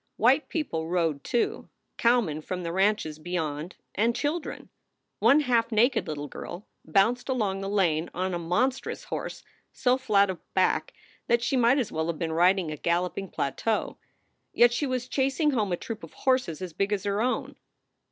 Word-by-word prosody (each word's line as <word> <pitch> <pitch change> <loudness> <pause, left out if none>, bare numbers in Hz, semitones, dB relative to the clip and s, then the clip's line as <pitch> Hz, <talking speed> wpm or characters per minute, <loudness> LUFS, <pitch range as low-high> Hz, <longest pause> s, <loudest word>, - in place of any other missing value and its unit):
White 260 +7 +3
people 165 - -2
rode, 165 -5 0
too 240 -2 -1 0.3
cowmen 230 -11 +2
from 180 +3 -4
the 170 - -3
ranches 190 -5 +1
beyond 160 -1 -3 0.2
and 230 +3 +1
children. 305 +2 -3 0.5
One 260 +8 +5
half 240 -4 +1
naked 230 +1 +3
little 145 -2 -4
girl 175 +7 -8 0.2
bounced 210 - +2
along 205 -7 0
the 195 - -3
lane 175 -5 +1
on 185 +1 -2
a 175 - -1
monstrous 235 +11 -1
horse - - -5 0.3
so 255 -1 +2
flat 205 -7 +3
of 180 - -8 0.2
back - - +1 0.3
that 235 0 +2
she 265 - +1
might 245 +1 +4
as 255 -6 -1
well 160 +1 -1
have 170 -2 -2
been 160 0 -2
riding 180 0 +3
a 150 - -5
galloping 180 +4 -1
plateau. 210 +12 -2 0.6
Yet 240 0 +6
she 285 +4 0
was 255 -1 -2
chasing 275 +3 +1
home 215 -7 0
a 175 - 0
troop 225 +3 -7
of - - -10
horses 255 - 0
as 180 -3 -6
big 195 +4 -1
as 205 -2 0
her 200 +1 0
own. 255 +2 -1
200 Hz, 175 wpm, -27 LUFS, 170-245 Hz, 0.6 s, Yet